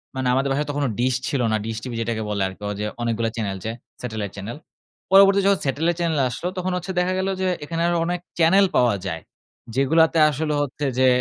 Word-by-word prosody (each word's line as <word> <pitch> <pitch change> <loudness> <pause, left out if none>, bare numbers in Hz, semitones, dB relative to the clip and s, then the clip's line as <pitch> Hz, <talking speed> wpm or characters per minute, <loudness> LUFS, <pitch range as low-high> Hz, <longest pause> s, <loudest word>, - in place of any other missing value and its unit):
মানে 130 -1 -1
আমাদের 135 +1 +1
বাসায় 145 +2 0
তখনো 145 -1 -1
ডিশ 125 +1 +2
ছিল 135 -3 0
না। 110 - +2
ডিশ 110 0 -4
টিভি 125 -2 -5
যেটাকে 115 -1 -2
বলে 100 -2 -1
আরকি 95 +2 -10
অজে 105 +1 -3 0.2
অনেকগুলো 115 -1 0
চ্যানেল 100 -4 -2
যে 110 - -1 0.3
স্যাটেলাইট 110 -5 -4
চ্যানেল। 105 +6 -6 0.6
পরবর্তী 195 0 +7
যখন 200 -1 +3
স্যাটেলাইট 160 +5 0
চ্যানেল 165 -3 0
আসলো 170 +8 -3
তখন 185 0 -1
হচ্ছে 180 +2 -5
দেখা 180 +1 +1
গেল 190 - -1
যে 185 - +1 0.2
এখানে 165 +2 -3
আরও 175 0 +1
অনেক 175 +1 -1 0.2
চ্যানেল 190 +5 +5
পাওয়া 120 -4 +4
যায়। 80 0 -4 0.5
যেগুলাতে 160 +5 +3
আসলে 150 +2 -2
হচ্ছে 145 +1 -3
যে 130 - +5
135 Hz, 205 wpm, -23 LUFS, 115-170 Hz, 0.6 s, পরবর্তী